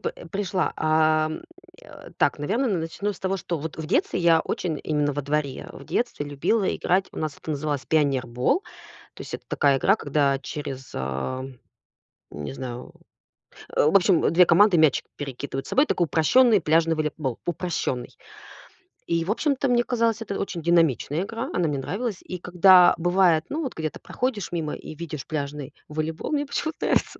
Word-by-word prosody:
п - - -2 0.2
пришла. 195 -2 -1
А, 155 0 +3
м, 155 - -5 0.4
э. - - -13
Так, - - +2
наверно, 215 - 0
н 195 -8 0
начну 200 +6 -3
с 180 - -14
того, 190 0 -1
что 170 -3 -4
вот 160 +1 -6
в 160 -1 -5
детстве 315 - +1
я 165 -1 +5
очень 160 -5 -3
именно 150 -2 0
во 145 - -3
дворе 145 -1 -2
в - - -11
детстве 235 -11 -2
любила 175 +9 0
играть. 190 +2 +1
У - - -7
нас 155 -2 -3
это - - -8
называлось 145 -2 -2
пионербол. 135 - +1 0.5
То - - -10
есть, - - -9
это - - -13
такая 140 -2 +2
игра, 195 +9 +3
когда 140 -5 +1
через, 135 -2 -7
ам, 120 - -4 0.7
не 75 - -6
знаю. 125 -2 -7 0.8
В 155 +6 +4
общем, 185 -2 +4
2 180 +2 +6
команды 180 +2 +5
мячик 155 -4 +3
перекидывают 135 -1 -5
собой. 285 +3 +3
Такой 175 - +1
упрощённый 210 - +4
пляжный 165 +1 +2
волейбол. 150 -4 -2
Упрощённый. 170 -7 -2 1.0
И, 165 -1 +1
в 195 - -1
общем-то, 275 +2 0
мне 240 -1 +3
казалось, 230 -2 0
это 200 -3 -4
очень 175 -4 -4
динамичная 165 -1 +2
игра. 230 +5 -5
Она 175 -2 +1
мне 145 -2 -1
нравилась. 205 - -3
И 180 - -6
когда 180 +1 +6
бывает, 175 -2 +3
ну 320 +2 -2
вот 265 - -4
где-то 155 -1 -4
проходишь 240 -8 -3
мимо 160 -3 -2
и - - -9
видишь 155 -3 -7
пляжный 145 -2 -5
волейбол, 155 - -4
мне 290 -1 0
почему-то 315 +3 -3
нравится - - 0
160 Hz, 170 wpm, -24 LUFS, 145-195 Hz, 1.0 s, 2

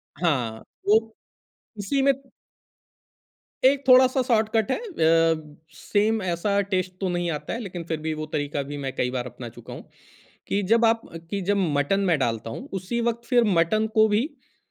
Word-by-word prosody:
हाँ, 130 -9 -1 0.2
वो 220 +2 +3 0.7
इसी 205 +8 -1
में 275 +1 +5 1.5
एक 275 +1 +4
थोड़ा-सा 255 0 +6
शॉर्टकट 220 -1 +1
है - - +1
अ, 165 - +1 0.2
सेम 215 +1 0
ऐसा 185 +3 0
टेस्ट 185 -1 0
तो 190 - 0
नहीं 175 -1 -1
आता 150 - -4
है - - -3
लेकिन 180 -6 -6
फिर 160 - -1
भी 160 0 -2
वो 155 0 -4
तरीका 145 -1 -1
भी 145 +1 -7
मैं 135 -2 -3
कई 125 - 0
बार 125 -1 -3
अपना 120 -1 -8
चुका - - -11
हूँ। - - -11 0.6
कि 200 - 0
जब 230 +4 +3
आप 225 0 +3 0.3
कि 200 -1 -1
जब 200 +2 +1 0.2
मटन 145 +8 +1
मैं 180 -5 +2
डालता 115 -3 -1
हूँ, 115 - -7
उसी 190 +5 -3
वक़्त 235 0 -2
फिर 245 -1 +3
मटन 215 +7 +2
को 220 0 +6
भी 215 +4 +1
अ, 310 - -16
195 Hz, 180 wpm, -24 LUFS, 155-225 Hz, 1.5 s, थोड़ा-सा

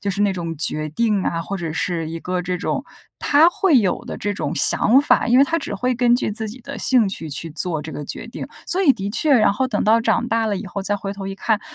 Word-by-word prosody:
就 200 - -1
是 200 +1 -2
那 205 -1 +2
种 165 -3 -5
决 155 0 -1
定 210 +4 0
啊， 165 - -1
或 195 +3 -4
者 165 -3 -4
是 165 -1 -2
一 165 - -5
个 180 +2 -3
这 180 0 -3
种 - - -2 0.4
她 295 +3 +5
会 350 -4 +3
有 200 -6 0
的 - - -6
这 205 0 -3
种 145 -6 -3
想 235 - +4
法， 285 - +2
因 245 +2 +5
为 275 - +7
她 330 +3 -1
只 - - -5
会 250 +5 0
根 240 0 +3
据 245 - -2
自 220 +1 -4
己 235 +5 -10
的 280 +3 -8
兴 245 -6 +3
趣 165 -4 -5
去 165 +3 -3
做 165 0 -1
这 155 +1 -8
个 150 - -6
决 - - -6
定。 235 - -7 0.2
所 375 +2 +1
以 300 -7 +6
的 200 -4 -5
确， 280 +6 +2
然 215 -5 +4
后 260 +6 0
等 - - -1
到 225 +2 +4
长 235 +1 +1
大 225 -1 +1
了 205 -2 -1
以 195 - -6
后 200 +2 -5
再 205 +1 -1
回 195 0 -5
头 195 -1 -7
一 195 - -5
看， 210 +2 0
205 Hz, 295 characters per minute, -21 LUFS, 180-245 Hz, 0.4 s, 为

